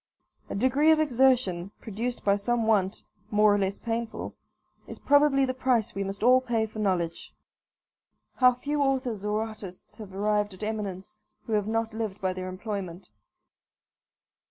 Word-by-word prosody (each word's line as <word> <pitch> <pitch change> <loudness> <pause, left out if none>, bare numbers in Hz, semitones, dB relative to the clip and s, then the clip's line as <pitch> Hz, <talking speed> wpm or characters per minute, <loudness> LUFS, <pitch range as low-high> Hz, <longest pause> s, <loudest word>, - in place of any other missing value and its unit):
A - - -4
degree 260 +8 +3
of 315 -1 +5
exertion, 250 - +2
produced 230 +4 -4
by 200 -1 +3
some 230 +3 0
want, 205 -3 +1 0.3
more 210 -1 +4
or 205 - +2
less 195 0 -1
painful, 230 0 -4 0.5
is - - -8
probably 285 -1 +4
the 255 - -2
price 250 -4 +1
we 195 - -2
must 195 +2 -4
all 255 +2 +6
pay 235 -3 0
for 215 0 -9
knowledge. 180 -5 -1 1.1
How 250 -1 +5
few 290 +4 -2
authors 260 -7 0
or 210 +1 0
artists 215 -3 -10
have 195 -3 -9
arrived 210 0 0
at 185 - -10
eminence 210 -2 -5 0.3
who 225 - -4
have 210 -1 +1
not 225 0 -1
lived 220 -3 -4
by 185 -1 -1
their 185 0 -5
employment? 185 -2 -6
215 Hz, 155 wpm, -27 LUFS, 195-250 Hz, 1.1 s, all